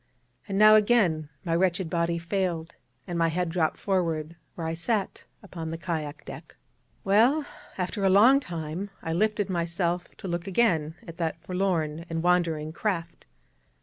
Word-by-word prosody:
And 195 - -2
now 215 +1 +8
again 205 -9 +3 0.2
my 165 -1 +1
wretched 180 0 +1
body 170 0 0
failed, 170 -1 -2 0.3
and 175 -2 -3
my 165 - +3
head 175 +1 -1
dropped 165 -2 0
forward, 170 -4 -1 0.2
where 165 - -5
I 160 - -1
sat, 195 +5 -2 0.2
upon 165 -5 -6
the 165 - -4
kayak 155 -4 -4
deck. - - -10 0.5
Well, 240 +10 +4 0.3
after 190 +2 -2
a 195 - +4
long 230 +9 +7
time, 170 - -5
I 165 - -2
lifted 210 +2 +1
myself 175 0 -1
to - - -7
look 175 +1 -3
again 175 -7 +1
at 165 - -9
that 165 -1 -2
forlorn 170 -3 -1
and 165 0 -2
wandering 165 -3 +1
craft. 170 -3 -3
175 Hz, 155 wpm, -27 LUFS, 165-195 Hz, 0.5 s, now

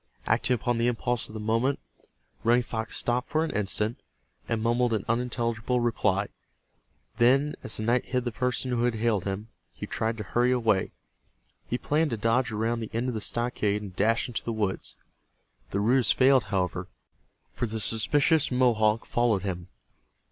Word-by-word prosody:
Acting 125 - +2
upon 120 0 -1
the 120 - +2
impulse 120 0 0
of 110 - -11
the - - -4
moment, 115 +6 +1 0.7
Running 120 +2 +4
Fox 110 -2 -3
stopped 125 +2 0
for 155 +1 +1
an - - -4
instant, 105 +2 -1 0.5
and 115 -1 0
mumbled 120 +1 +1
an 105 -3 -1
unintelligible 115 0 0
reply. 105 -4 +1 0.9
Then, 135 +5 +4
as - - -2
the 110 - -3
night 120 +2 +2
hid 125 -1 -1
the 120 - -1
person 125 +2 -1
who 120 -1 +1
had 120 -2 +1
hailed 110 -4 0
him, 100 +3 -4 0.2
he - - -7
tried 115 0 -2
to 105 - -4
hurry 120 +5 +1
away. 115 -6 +1 0.8
He 120 - -1
planned 150 +4 +1
to 115 - -2
dodge 115 +3 +1
around 115 +2 -1
the 110 - -5
end 120 +3 -1
of - - -2
the 110 - -3
stockade 105 -3 -1
and 95 -3 -9
dash 115 +5 +2
into 120 - -4
the 115 - -3
woods. 105 -3 -2 0.7
The 100 - -1
ruse 120 +3 +3
failed, 130 -1 +4
however, 90 -2 -2 0.7
for 120 - -2
the 110 +1 -4
suspicious 145 +8 +2
Mohawk 115 -4 +2
followed 115 -6 +1
him. 90 -3 -4
115 Hz, 175 wpm, -27 LUFS, 110-125 Hz, 0.9 s, Running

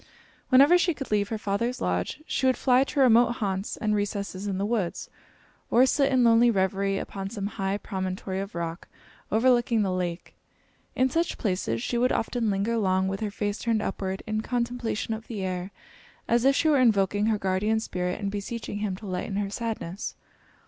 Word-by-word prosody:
Whenever 280 +7 +7
she 345 -2 +1
could 270 -5 -7
leave 205 -1 +1
her 225 - -2
father's 215 +4 -2
lodge 90 - -2
she 265 - 0
would 260 - +3
fly 255 0 +4
to 280 - -4
remote 240 -2 +5
haunts 195 -3 -3
and 215 -1 0
recesses 200 -1 -2
in 195 -2 -2
the 195 - -1
woods, 210 -6 -2 0.6
or 245 +3 +5
sit 275 +1 +2
in 255 -2 +4
lonely 230 +1 +5
reverie 195 -1 +1
upon 195 0 -5
some 200 -2 -5
high 195 -1 -2
promontory 190 -1 -4
of 195 0 -6
rock 170 0 -4 0.4
overlooking 235 -1 +3
the 190 - 0
lake. 175 -1 -3 0.6
In 255 - +3
such 335 +3 0
places 180 - -1
she 240 - -1
would 250 +1 +3
often 230 -1 0
linger 205 +4 0
long, 190 -3 +1
with 195 0 -3
her 215 - -2
face 205 0 -3
turned 225 -2 0
upward, 190 -1 -3
in 215 0 -1
contemplation 235 -2 -2
of 220 +1 -7
the 210 -5 -4
air, 185 0 -3 0.6
as 235 +1 +2
if 275 0 +5
she 320 - +2
were 295 -3 +4
invoking 205 -3 +3
her 220 -1 +2
guardian 200 +3 0
spirit 180 -4 -3
and 200 -2 -2
beseeching 205 +1 -5
him 205 -3 -2
to 210 - -11
lighten 185 +1 -3
her 200 -1 -2
sadness. 215 -4 -4
210 Hz, 190 wpm, -26 LUFS, 195-235 Hz, 0.6 s, Whenever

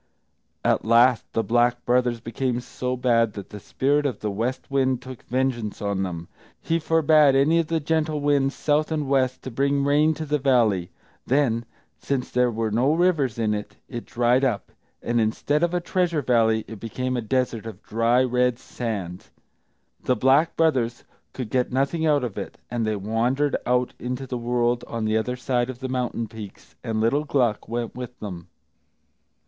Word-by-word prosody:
At - - +2
last 120 +2 +4
the 115 - +1
Black 120 +3 +1
Brothers 120 -1 +2
became 120 +2 -2
so 125 +1 -4
bad 115 -3 +2
that 100 -2 -9
the 105 - -7
Spirit 145 +7 +1
of 130 - -4
the 105 - -2
West 120 +7 -3
Wind 130 -2 +2
took 130 -1 -10
vengeance 125 -4 -2
on 100 -2 -1
them; 85 -3 -4 0.3
he 165 +1 0
forbade 155 -3 +4
any 150 +5 +4
of 165 - 0
the 165 0 0
gentle 155 0 0
winds, 140 -1 +1
south 150 +1 +1
and 150 -3 -1
west, 130 -2 +1
to 130 - -6
bring 140 +3 +1
rain 150 +3 +3
to 155 - -5
the 150 0 0
valley. 115 -10 +2 0.4
Then, 120 -4 +1 0.3
since 135 -3 -2
there 125 0 +3
were 110 -1 -2
no 125 +6 +2
rivers 165 -9 +2
in 110 -2 +1
it, 105 0 -5
it 120 -3 -7
dried 120 +2 +2
up, 120 -7 -1 0.3
and 120 0 +1
instead 140 +7 0
of 170 0 +2
a 175 - 0
treasure 175 -3 0
valley 110 -3 +2
it 110 -2 -9
became 125 +4 -3
a 120 - -1
desert 120 -2 -1
of 105 -2 -9
dry, 115 +3 +2
red 125 -1 +1
sand. 100 -9 -5 0.8
The 125 - +3
Black 135 +7 +3
Brothers 130 -8 +1 0.3
could 125 -5 -6
get 125 -1 +1
nothing 140 +5 0
out 145 -3 +3
of 115 -5 -4
it, - - -7
and 115 -2 -1
they 110 - 0
wandered 120 +8 0
out 125 0 +1
into 125 +2 -4
the 125 -1 -4
world 120 0 0
on 115 -2 -3
the 110 0 +1
other 120 +3 0
side 125 -1 -1
of 130 - -5
the 130 +1 -5
mountain 125 -3 -2
peaks; 105 -3 -11
and 110 -1 -2
little 115 +7 +2
Gluck 125 -7 0
went 120 0 -3
with 125 0 -8
them. 90 -5 -7
125 Hz, 185 wpm, -24 LUFS, 115-140 Hz, 0.8 s, last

